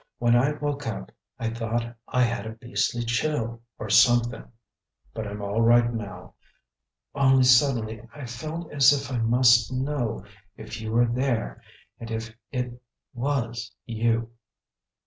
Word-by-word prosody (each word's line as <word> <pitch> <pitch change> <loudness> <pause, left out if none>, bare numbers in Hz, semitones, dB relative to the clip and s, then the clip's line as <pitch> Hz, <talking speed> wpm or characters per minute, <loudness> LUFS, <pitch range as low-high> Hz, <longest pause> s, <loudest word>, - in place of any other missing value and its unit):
When 120 0 +3
I 135 +5 +3
woke 145 -1 -3
up 65 - -5 0.3
I 115 -1 -2
thought 115 +1 -3
I 125 - +2
had 120 -1 -1
a 110 - -6
beastly 115 +1 -2
chill 115 -1 -1 0.2
or 105 - -6
something; 120 +1 +4 0.6
but 110 -1 -4
I'm 100 0 -6
all 100 +3 0
right 120 +1 +4
now; 105 -3 -7 0.8
only 135 -2 +4
suddenly 125 -4 +3
I 145 -3 -8
felt 155 +8 -6
as 140 -1 +6
if 140 -1 -1
I 125 - -1
must 120 0 +4
know 130 -6 -2 0.3
if 110 +1 -8
you 110 0 -4
were 120 +2 +4
there, 120 - -1 0.4
and 115 - -8
if 115 0 -5 0.2
it 125 -2 -4 0.3
was 120 -4 -2
you." 115 0 0
120 Hz, 145 wpm, -26 LUFS, 115-130 Hz, 0.8 s, as